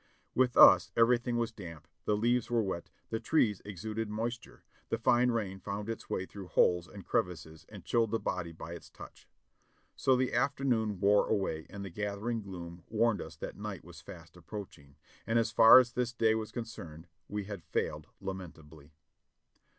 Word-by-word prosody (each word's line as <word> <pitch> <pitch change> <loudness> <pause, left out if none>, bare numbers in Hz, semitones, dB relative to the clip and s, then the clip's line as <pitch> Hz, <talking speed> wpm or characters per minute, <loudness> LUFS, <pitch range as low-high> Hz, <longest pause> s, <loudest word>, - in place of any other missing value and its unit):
With 125 -1 +2
us, 95 -2 +8
everything 120 +1 +3
was 115 0 -1
damp, 85 -8 -10 0.2
the 105 - +2
leaves 120 +2 +1
were 120 -2 +2
wet, 95 -3 -4 0.2
the 110 - -1
trees 115 -5 +2
exuded 105 +3 -5
moisture, 115 +3 -5 0.3
the 115 - 0
fine 120 +2 +3
rain 100 -5 -2
found 100 +2 -5
its 115 - -6
way 95 - -2
through 95 -1 -10
holes 90 -1 +3
and 100 -1 -11
crevices 80 -3 -2
and - - -11
chilled 115 -2 +2
the 115 - +1
body 90 -2 -3
by 80 +1 -8
its 85 - -10
touch. - - -13 0.7
So 130 - +3
the 130 0 0
afternoon 120 -8 +1
wore 100 +1 +4
away 95 -7 -1
and 100 0 -7
the 95 - -7
gath 100 +2 -3
ering 115 +2 -2
gloom 85 -3 -8
warned 115 0 +2
us - - -8
that - - -7
night - - -6
was - - -12
fast - - -12
approaching, 75 -10 -10 0.3
and 115 +1 +2
as 115 -1 +2
far 115 +2 +9
as 125 -2 +5
this 125 -1 -1
day 110 -2 +3
was 110 -1 -3
concerned, 90 -9 -7 0.2
we 105 0 -3
had 100 -2 -7
failed - - -3
lamentably. 80 -6 -9
105 Hz, 180 wpm, -31 LUFS, 90-115 Hz, 0.7 s, far